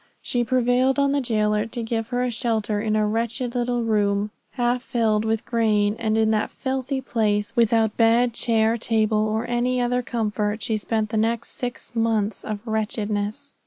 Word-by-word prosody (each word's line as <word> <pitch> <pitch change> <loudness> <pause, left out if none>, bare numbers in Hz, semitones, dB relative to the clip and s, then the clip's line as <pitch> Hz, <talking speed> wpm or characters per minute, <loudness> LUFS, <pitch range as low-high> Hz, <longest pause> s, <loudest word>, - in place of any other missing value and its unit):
She 245 -1 0
prevailed 250 +2 +2
on 280 0 +3
the 285 0 +1
jailer 215 -3 +1
to 235 +1 -5
give 225 -1 -2
her 245 0 -1
a 250 - -1
shelter 220 -3 -1
in 215 -1 0
a 215 0 +2
wretched 230 +3 -2
little 245 -1 0
room 205 -2 +1 0.2
half 245 -1 0
filled 220 -4 0
with 220 0 -1
grain, 215 -3 +1
and 220 -1 0
in 220 0 +3
that 215 -1 0
filthy 265 0 -3
place, 210 -4 0
without 225 -2 +2
bed, 235 +1 +4
chair, 225 0 +2
table, 220 -1 +1
or 215 +2 -1
any 245 +1 0
other 245 0 +1
comfort, 215 -3 -2
she 220 - 0
spent 215 0 -1
the 220 - -1
next 225 +1 0
six 245 -1 -6
months 225 -3 0
of 210 -2 -4
wretchedness. 215 +4 -2
225 Hz, 175 wpm, -23 LUFS, 215-245 Hz, 0.2 s, bed